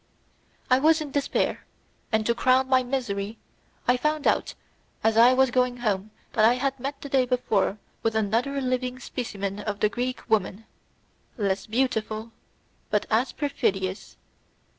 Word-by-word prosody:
I 255 Hz, -, +6 dB
was 315 Hz, +3 st, +4 dB
in 300 Hz, -2 st, -5 dB
despair, 285 Hz, 0 st, 0 dB, 0.5 s
and 220 Hz, -1 st, +1 dB
to 235 Hz, -, +3 dB
crown 255 Hz, +2 st, +3 dB
my 260 Hz, -1 st, +4 dB
misery 230 Hz, -5 st, -3 dB, 0.5 s
I 245 Hz, -, +4 dB
found 300 Hz, +3 st, -1 dB
out -, -, +1 dB, 0.5 s
as 220 Hz, 0 st, +3 dB
I 240 Hz, +3 st, +7 dB
was 265 Hz, -1 st, +4 dB
going 250 Hz, 0 st, +1 dB
home 210 Hz, -4 st, -1 dB, 0.2 s
that 215 Hz, -, +3 dB
I 235 Hz, +3 st, +6 dB
had 270 Hz, +1 st, -1 dB
met 275 Hz, +2 st, -4 dB
the -, -, -6 dB
day 265 Hz, -2 st, +2 dB
before 220 Hz, -5 st, +1 dB, 0.2 s
with 225 Hz, -1 st, 0 dB
another 230 Hz, +6 st, 0 dB
living 255 Hz, 0 st, -1 dB
specimen 205 Hz, -6 st, -4 dB
of 205 Hz, -1 st, -4 dB
the 210 Hz, -, +3 dB
Greek 250 Hz, +3 st, -4 dB
woman, 220 Hz, -1 st, 0 dB, 0.7 s
less 195 Hz, -3 st, -1 dB
beautiful 220 Hz, -2 st, -1 dB, 0.6 s
but 210 Hz, -1 st, +1 dB
as 230 Hz, +4 st, +2 dB
perfidious. 195 Hz, -9 st, -2 dB
245 Hz, 150 wpm, -26 LUFS, 215-260 Hz, 0.7 s, I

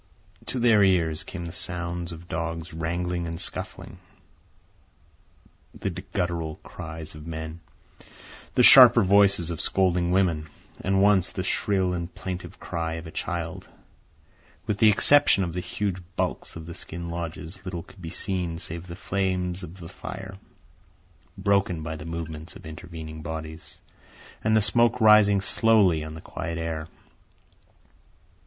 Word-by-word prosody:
To -, -, -3 dB
their 115 Hz, -4 st, +5 dB
ears 85 Hz, -5 st, +2 dB
came 85 Hz, -3 st, -7 dB
the 85 Hz, -, -5 dB
sounds 85 Hz, 0 st, -2 dB
of 85 Hz, +1 st, -10 dB
dogs 85 Hz, +1 st, -4 dB
wrangling 85 Hz, +1 st, -2 dB
and 80 Hz, 0 st, -5 dB
scuffling, -, -, -5 dB, 1.8 s
the -, -, -3 dB
guttural 85 Hz, -3 st, -3 dB
cries 80 Hz, -1 st, -8 dB
of 75 Hz, +1 st, -11 dB
men, 80 Hz, 0 st, -6 dB, 1.0 s
the -, -, +5 dB
sharper -, -, +10 dB
voices 100 Hz, -3 st, +4 dB
of 80 Hz, -, -3 dB
scolding 90 Hz, -2 st, +1 dB
women, 85 Hz, -5 st, +1 dB, 0.3 s
and 95 Hz, +1 st, +2 dB
once 100 Hz, -3 st, +4 dB
the -, -, -3 dB
shrill 95 Hz, -3 st, +1 dB
and 85 Hz, 0 st, -4 dB
plaintive 90 Hz, -1 st, -6 dB
cry 80 Hz, -1 st, -3 dB
of 80 Hz, +1 st, -7 dB
a 80 Hz, -, -8 dB
child. 85 Hz, +1 st, -4 dB, 1.0 s
With 105 Hz, -2 st, -2 dB
the 110 Hz, -, +7 dB
exception 105 Hz, -1 st, +5 dB
of 85 Hz, -2 st, -3 dB
the 90 Hz, -, -2 dB
huge 95 Hz, 0 st, -3 dB
bulks -, -, -2 dB
of 80 Hz, -1 st, -8 dB
the 85 Hz, -, -7 dB
skin 85 Hz, +1 st, -7 dB
lodges, 85 Hz, +2 st, -6 dB
little 90 Hz, -3 st, -5 dB
could 95 Hz, -, -17 dB
be 80 Hz, -, -6 dB
seen 90 Hz, -2 st, -2 dB
save 85 Hz, +1 st, -7 dB
the 85 Hz, -, -7 dB
flames 95 Hz, -1 st, -1 dB
of 90 Hz, +1 st, -10 dB
the 85 Hz, -, -8 dB
fire, 95 Hz, +1 st, -8 dB, 1.0 s
broken 95 Hz, -4 st, +1 dB
by 80 Hz, 0 st, -4 dB
the 75 Hz, 0 st, -8 dB
movements 80 Hz, -1 st, -6 dB
of -, -, -12 dB
intervening 80 Hz, 0 st, -8 dB
bodies, 80 Hz, 0 st, -7 dB, 0.6 s
and 110 Hz, 0 st, +3 dB
the 110 Hz, -, +3 dB
smoke 120 Hz, +3 st, +3 dB
rising 105 Hz, -3 st, +6 dB
slowly 100 Hz, -6 st, +3 dB
on 80 Hz, 0 st, -7 dB
the 80 Hz, -, -9 dB
quiet 85 Hz, 0 st, -5 dB
air. 80 Hz, -1 st, -3 dB
85 Hz, 145 wpm, -26 LUFS, 80-95 Hz, 1.8 s, sharper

